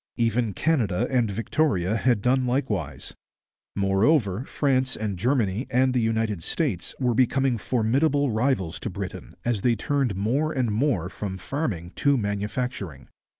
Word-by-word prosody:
Even 115 Hz, -2 st, +1 dB
Canada 120 Hz, -, +1 dB
and 120 Hz, -4 st, +2 dB
Victoria 110 Hz, -, 0 dB
had 115 Hz, -3 st, +1 dB
done 130 Hz, +1 st, +2 dB
likewise. 105 Hz, -, -2 dB, 0.6 s
Moreover, 100 Hz, -, +2 dB
France 130 Hz, -3 st, +1 dB
and 105 Hz, -3 st, -2 dB
Germany 115 Hz, +1 st, 0 dB
and 130 Hz, +1 st, +2 dB
the 125 Hz, -, +2 dB
United 110 Hz, -4 st, 0 dB
States 115 Hz, -, -2 dB
were 125 Hz, -3 st, +2 dB
becoming 130 Hz, +2 st, +2 dB
formidable 135 Hz, +6 st, +1 dB
rivals 110 Hz, -6 st, 0 dB
to -, -, -4 dB
Britain, 95 Hz, 0 st, -7 dB
as 120 Hz, -4 st, 0 dB
they 120 Hz, +1 st, +3 dB
turned 135 Hz, -1 st, 0 dB
more 135 Hz, +11 st, 0 dB
and 125 Hz, -5 st, 0 dB
more 110 Hz, -, +1 dB
from 95 Hz, 0 st, -5 dB
farming 95 Hz, -, -3 dB
to 140 Hz, -1 st, +3 dB
manufacturing. 105 Hz, -, -3 dB
115 Hz, 140 wpm, -25 LUFS, 100-130 Hz, 0.6 s, they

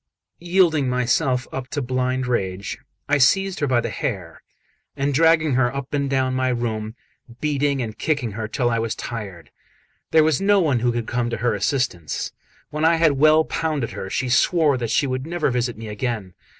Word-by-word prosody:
Yielding 170 Hz, -6 st, +2 dB
myself 125 Hz, +1 st, +1 dB
up 130 Hz, -1 st, -5 dB
to 145 Hz, -, -3 dB
blind 130 Hz, 0 st, -1 dB
rage, 100 Hz, -5 st, -2 dB, 0.3 s
I 145 Hz, 0 st, +2 dB
seized 195 Hz, +7 st, +3 dB
her 145 Hz, -, 0 dB
by 125 Hz, -2 st, +2 dB
the 115 Hz, -1 st, -4 dB
hair, -, -, -4 dB, 0.6 s
and 140 Hz, +1 st, 0 dB
dragged 160 Hz, 0 st, +4 dB
her 125 Hz, -1 st, +2 dB
up 140 Hz, 0 st, -5 dB
and 140 Hz, -1 st, 0 dB
down 130 Hz, -1 st, +1 dB
my 130 Hz, 0 st, 0 dB
room, 110 Hz, -3 st, -3 dB, 0.4 s
beating 145 Hz, -3 st, 0 dB
and 110 Hz, -2 st, -6 dB
kicking 145 Hz, -8 st, -1 dB
her 110 Hz, +1 st, -4 dB
till 120 Hz, +2 st, 0 dB
I 115 Hz, -, +1 dB
was 115 Hz, -1 st, -2 dB
tired. 100 Hz, -8 st, -7 dB, 0.6 s
There 160 Hz, -1 st, +5 dB
was 155 Hz, 0 st, +1 dB
no 200 Hz, 0 st, +4 dB
one 145 Hz, -9 st, +2 dB
who 120 Hz, +1 st, +1 dB
could 120 Hz, -1 st, -3 dB
come 120 Hz, 0 st, -1 dB
to 115 Hz, -, -3 dB
her 120 Hz, +2 st, 0 dB
assistance. 105 Hz, -, -2 dB, 0.4 s
When 150 Hz, +1 st, -3 dB
I 165 Hz, +1 st, +5 dB
had 165 Hz, -2 st, +4 dB
well 155 Hz, +1 st, +6 dB
pounded 155 Hz, -7 st, -2 dB
her 95 Hz, -, -6 dB
she 130 Hz, -, -1 dB
swore 145 Hz, +4 st, +3 dB
that 120 Hz, -3 st, -3 dB
she 145 Hz, -, +2 dB
would 130 Hz, +1 st, -3 dB
never 170 Hz, -4 st, 0 dB
visit 120 Hz, -1 st, -1 dB
me 110 Hz, 0 st, -8 dB
again. 105 Hz, -3 st, -4 dB
130 Hz, 190 wpm, -22 LUFS, 120-150 Hz, 0.6 s, well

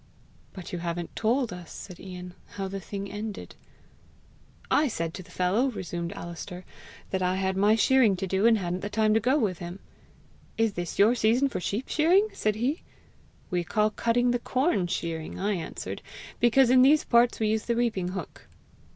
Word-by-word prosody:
"But 185 Hz, -2 st, -9 dB
you 175 Hz, -, -2 dB
haven't 170 Hz, 0 st, -4 dB
told 235 Hz, -1 st, +1 dB
us," 180 Hz, -2 st, -10 dB
said 180 Hz, -3 st, -9 dB
Ian, 180 Hz, -1 st, -8 dB, 0.2 s
"how 195 Hz, -1 st, -3 dB
the 195 Hz, +1 st, -5 dB
thing 200 Hz, +1 st, -6 dB
ended." 210 Hz, 0 st, -6 dB, 1.2 s
"I 300 Hz, -, +4 dB
said 165 Hz, -9 st, -3 dB
to -, -, -7 dB
the 180 Hz, -, -16 dB
fellow," 185 Hz, +8 st, +1 dB
resumed 175 Hz, -6 st, -4 dB
Alister, 175 Hz, +1 st, -8 dB, 0.5 s
"that 190 Hz, -, -1 dB
I 180 Hz, 0 st, +1 dB
had 190 Hz, 0 st, -1 dB
my 205 Hz, +3 st, +4 dB
shearing 225 Hz, -2 st, +4 dB
to 185 Hz, -, -3 dB
do, 190 Hz, +4 st, +2 dB
and 230 Hz, -1 st, +5 dB
hadn't 180 Hz, -2 st, -2 dB
the 205 Hz, -, -4 dB
time 215 Hz, 0 st, +2 dB
to 220 Hz, -, +4 dB
go 255 Hz, +6 st, +2 dB
with 200 Hz, -, 0 dB
him. 175 Hz, +1 st, -6 dB, 0.8 s
'Is 225 Hz, -2 st, +2 dB
this 175 Hz, -2 st, -5 dB
your 210 Hz, +4 st, +6 dB
season 245 Hz, +4 st, +2 dB
for 185 Hz, -, -3 dB
sheep 205 Hz, +7 st, -3 dB
shearing?' 365 Hz, +7 st, +3 dB
said 215 Hz, -1 st, 0 dB
he.'We 230 Hz, -, -5 dB
call 215 Hz, +4 st, +1 dB
cutting 240 Hz, +3 st, +1 dB
the 245 Hz, -, 0 dB
corn 255 Hz, -, +1 dB
shearing,' 165 Hz, -2 st, -4 dB
I 205 Hz, +2 st, 0 dB
answered, 170 Hz, -4 st, -5 dB, 0.4 s
'because 240 Hz, +1 st, +5 dB
in 255 Hz, 0 st, +7 dB
these 290 Hz, +4 st, +5 dB
parts 235 Hz, 0 st, +3 dB
we 215 Hz, -1 st, +1 dB
use 220 Hz, 0 st, 0 dB
the 235 Hz, -, 0 dB
reaping 225 Hz, -7 st, 0 dB
hook.' 185 Hz, -2 st, -7 dB
205 Hz, 185 wpm, -27 LUFS, 180-235 Hz, 1.2 s, in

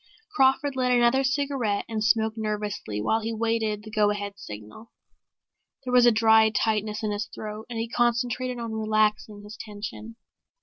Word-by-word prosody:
Crawford 265 Hz, -3 st, +2 dB
lit 255 Hz, -1 st, +1 dB
another 245 Hz, +2 st, +4 dB
cigarette 270 Hz, -6 st, -1 dB
and 220 Hz, -2 st, -3 dB
smoked 220 Hz, 0 st, +2 dB
nervously 210 Hz, -, -3 dB
while 220 Hz, -, +1 dB
he 225 Hz, -, -3 dB
awaited 225 Hz, -2 st, -1 dB
the 215 Hz, -, -10 dB
go 210 Hz, -1 st, +3 dB
ahead 205 Hz, -1 st, -3 dB
signal. 110 Hz, -, -10 dB, 0.9 s
There 250 Hz, -1 st, -4 dB
was 245 Hz, -1 st, +6 dB
a -, -, +7 dB
dry 220 Hz, 0 st, +5 dB
tightness 215 Hz, 0 st, -1 dB
in 215 Hz, -, -1 dB
his 205 Hz, 0 st, -3 dB
throat 215 Hz, +1 st, -8 dB
and 235 Hz, -, -5 dB
he 225 Hz, +1 st, -2 dB
concentrated 240 Hz, +1 st, 0 dB
on 230 Hz, -1 st, -5 dB
relaxing 215 Hz, -1 st, 0 dB
his 210 Hz, +1 st, -10 dB
tension. 215 Hz, +1 st, -8 dB
220 Hz, 165 wpm, -26 LUFS, 210-240 Hz, 0.9 s, a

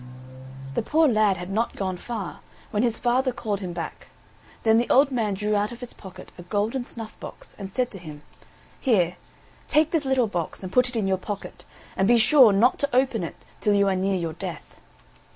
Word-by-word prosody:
The -, -, 0 dB
poor 310 Hz, +7 st, +3 dB
lad 215 Hz, -6 st, +3 dB
had 180 Hz, +2 st, -6 dB
not 225 Hz, +4 st, -1 dB
gone 190 Hz, -2 st, -2 dB
far, 205 Hz, 0 st, -6 dB, 0.3 s
when 210 Hz, -, +1 dB
his 235 Hz, -2 st, +1 dB
father 255 Hz, +2 st, +1 dB
called 210 Hz, -4 st, -3 dB
him 185 Hz, -3 st, -5 dB
back; 170 Hz, -2 st, -6 dB, 0.6 s
then 225 Hz, 0 st, +5 dB
the 240 Hz, -, -1 dB
old 275 Hz, +2 st, +5 dB
man 220 Hz, -6 st, 0 dB
drew 210 Hz, +2 st, 0 dB
out 205 Hz, +2 st, 0 dB
of 240 Hz, -, -9 dB
his 245 Hz, -1 st, -8 dB
pocket 190 Hz, -2 st, -12 dB
a -, -, -6 dB
golden 215 Hz, +7 st, -1 dB
snuff 225 Hz, -3 st, -9 dB
box, -, -, -11 dB
and 195 Hz, -1 st, -6 dB
said 250 Hz, +5 st, -1 dB
to 195 Hz, -, -9 dB
him: 150 Hz, -3 st, -10 dB, 0.6 s
"Here, 185 Hz, -, +2 dB, 0.5 s
take 310 Hz, +1 st, +3 dB
this 325 Hz, -3 st, +1 dB
little 265 Hz, -2 st, +2 dB
box, 180 Hz, -3 st, -4 dB
and 185 Hz, -, -6 dB
put 250 Hz, 0 st, +4 dB
it 250 Hz, -, -8 dB
in 220 Hz, -3 st, 0 dB
your 190 Hz, -1 st, +2 dB
pocket, 200 Hz, +1 st, -7 dB, 0.3 s
and 190 Hz, -, +2 dB
be 240 Hz, +1 st, +6 dB
sure 250 Hz, 0 st, +7 dB
not 220 Hz, +6 st, +3 dB
to 285 Hz, -, 0 dB
open 255 Hz, -6 st, +2 dB
it 165 Hz, -, -5 dB, 0.2 s
till 205 Hz, -1 st, +2 dB
you 200 Hz, 0 st, +3 dB
are 190 Hz, -, +1 dB
near 190 Hz, +1 st, 0 dB
your 165 Hz, -3 st, -3 dB
death." 160 Hz, -, -7 dB
215 Hz, 210 wpm, -25 LUFS, 190-245 Hz, 0.6 s, sure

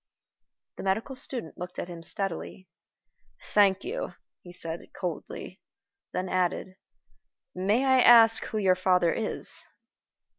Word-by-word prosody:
The -, -, -6 dB
medical 220 Hz, +8 st, -1 dB
student 245 Hz, -, -5 dB
looked 180 Hz, +1 st, -7 dB
at -, -, -4 dB
him 170 Hz, -2 st, -9 dB
steadily. 185 Hz, +1 st, -4 dB, 0.9 s
"Thank 200 Hz, -2 st, +4 dB
you," 435 Hz, +8 st, -4 dB, 0.3 s
he 175 Hz, -, -12 dB
said, 165 Hz, -1 st, -5 dB, 0.2 s
coldly; 180 Hz, -4 st, -6 dB, 0.5 s
then 185 Hz, -, -3 dB
added, 185 Hz, +1 st, -1 dB, 0.8 s
"May 205 Hz, +8 st, +1 dB
I 260 Hz, -1 st, +5 dB
ask 225 Hz, -2 st, +7 dB
who 220 Hz, -, -4 dB
your 190 Hz, -3 st, +4 dB
father 180 Hz, -2 st, +2 dB
is?" 220 Hz, -, 0 dB
190 Hz, 120 wpm, -27 LUFS, 180-225 Hz, 0.9 s, ask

